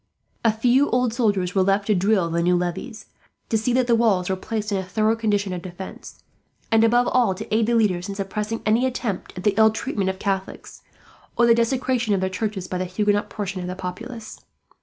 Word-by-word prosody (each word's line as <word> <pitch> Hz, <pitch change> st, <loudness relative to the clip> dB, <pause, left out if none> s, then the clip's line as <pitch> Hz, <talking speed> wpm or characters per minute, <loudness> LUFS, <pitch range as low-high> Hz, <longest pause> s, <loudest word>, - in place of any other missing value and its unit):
A 225 Hz, -, +4 dB
few 245 Hz, +6 st, +2 dB
old 250 Hz, -2 st, +1 dB
soldiers 205 Hz, -7 st, 0 dB
were 195 Hz, -, +3 dB
left 195 Hz, +2 st, +2 dB
to 215 Hz, -, +2 dB
drill 190 Hz, -2 st, +2 dB
the 170 Hz, +1 st, 0 dB
new 180 Hz, +1 st, +3 dB
levies, 195 Hz, +5 st, -4 dB, 0.4 s
to -, -, 0 dB
see 220 Hz, +3 st, +1 dB
that 255 Hz, 0 st, +3 dB
the 240 Hz, -, +2 dB
walls 205 Hz, -6 st, +2 dB
were -, -, +1 dB
placed 215 Hz, +2 st, -4 dB
in 195 Hz, -, +1 dB
a -, -, -3 dB
thorough 215 Hz, +4 st, +1 dB
condition 205 Hz, -4 st, 0 dB
of 180 Hz, -, -4 dB
defence, 185 Hz, +1 st, -10 dB, 0.5 s
and 225 Hz, 0 st, +5 dB
above 240 Hz, +2 st, +3 dB
all 235 Hz, -7 st, +2 dB
to 185 Hz, -, -6 dB
aid 220 Hz, 0 st, +2 dB
the 235 Hz, -, +2 dB
leaders 195 Hz, -4 st, +1 dB
in 200 Hz, -, -4 dB
suppressing 210 Hz, +3 st, -3 dB
any 230 Hz, +4 st, +3 dB
attempt 235 Hz, -8 st, -4 dB
at 180 Hz, -, -6 dB
the 210 Hz, -, +3 dB
ill 220 Hz, 0 st, +7 dB
treatment 215 Hz, -3 st, -2 dB
of 190 Hz, -, -3 dB
Catholics, 195 Hz, -1 st, -4 dB, 0.6 s
or 240 Hz, -, +5 dB
the 235 Hz, -, +6 dB
desecration 235 Hz, -1 st, +1 dB
of -, -, 0 dB
their 190 Hz, 0 st, -1 dB
churches, 200 Hz, -2 st, -3 dB
by 180 Hz, -, -3 dB
the 185 Hz, -, -1 dB
Huguenot 205 Hz, +3 st, 0 dB
portion 195 Hz, -3 st, -4 dB
of 180 Hz, -, -5 dB
the 180 Hz, -, -4 dB
population. 220 Hz, +5 st, -7 dB
210 Hz, 220 wpm, -23 LUFS, 190-230 Hz, 0.6 s, ill